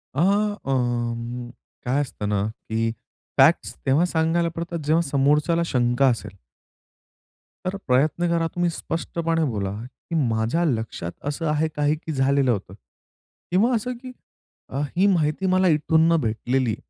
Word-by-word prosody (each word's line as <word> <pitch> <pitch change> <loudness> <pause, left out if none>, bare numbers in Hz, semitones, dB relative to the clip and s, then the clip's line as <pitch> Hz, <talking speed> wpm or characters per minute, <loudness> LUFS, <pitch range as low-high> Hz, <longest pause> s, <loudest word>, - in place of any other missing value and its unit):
अ, - - -1 0.5
अं, 120 -2 -2 0.4
काय 135 +4 +1
असतं 115 -7 -4
ना, 100 -1 +1 0.2
की 115 +1 0 0.5
फॅक्ट्स - - +4
तेव्हा 140 +6 +3
सांगायला 170 0 +1
पडतात, 170 0 -4
जेव्हा 160 +2 +3
समोरच्याला 150 +4 +2
शंका 125 -1 +2
असेल. 105 -5 -4 1.3
तर 185 +2 -1
अ, - - -3
प्रयत्न 150 +7 +2
करा 165 -1 +1
तुम्ही 175 0 +1
स्पष्टपणे 165 0 -2
बोला, 100 -2 -2
की 130 +6 -9
माझ्या 115 +9 0
लक्षात 110 - -2 0.2
असं 165 +3 -3
आहे 155 +1 +1
काही, 150 +1 +2
की 160 +1 -7
झालेलं 135 -1 +2
होतं 95 -4 -3 0.8
किंवा 220 +8 +3
असं 245 +3 -2
की 255 -1 -8 0.6
अ, 135 - -2 0.2
ही 190 - +4
माहिती 170 -1 +1
मला 185 0 +3
इथून 160 +2 +3
न - - +5
भेटलेली. 120 +1 0
145 Hz, 140 wpm, -24 LUFS, 120-165 Hz, 1.3 s, न